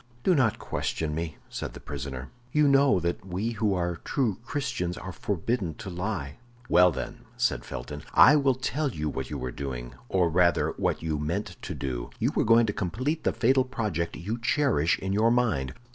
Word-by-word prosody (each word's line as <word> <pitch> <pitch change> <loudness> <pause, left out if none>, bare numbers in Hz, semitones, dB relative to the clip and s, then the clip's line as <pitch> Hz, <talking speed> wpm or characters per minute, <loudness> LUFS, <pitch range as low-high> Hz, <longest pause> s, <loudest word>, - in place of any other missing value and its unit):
"Do 185 - +4
not 125 -9 +3
question 80 -2 -2
me," 80 -1 -4
said - - -5
the - - -9
prisoner; 70 -2 -6 0.2
"you 150 +1 +4
know 140 -6 +5
that 85 +1 -2
we 95 +5 -2
who 105 -3 +1
are 85 -1 -1
true 115 - -1
Christians 90 -12 -2
are 95 - -6
forbidden 100 -2 -2
to 95 - -7
lie." 90 -6 -3 0.3
"Well, 90 0 +6
then," - - -6
said - - +1
Felton, 75 +5 -6
"I 150 - +9
will 140 -3 +3
tell 140 +3 -1
you 75 -9 -3
what 65 -2 -4
you - - -4
were 65 0 -4
doing, 60 -3 -5 0.2
or 90 -2 +3
rather 85 +1 +3
what - - 0
you 80 -2 -1
meant 90 +5 -2
to - - -5
do; 60 -3 -4
you - - +1
were - - +2
going 115 +1 +6
to 105 - -1
complete 130 - -2
the - - +4
fatal 130 +3 +3
project 105 - -2
you 105 +8 -4
cherish 115 - +2
in 95 0 -3
your 110 +3 +4
mind. 110 - +1
95 Hz, 190 wpm, -27 LUFS, 80-120 Hz, 0.3 s, I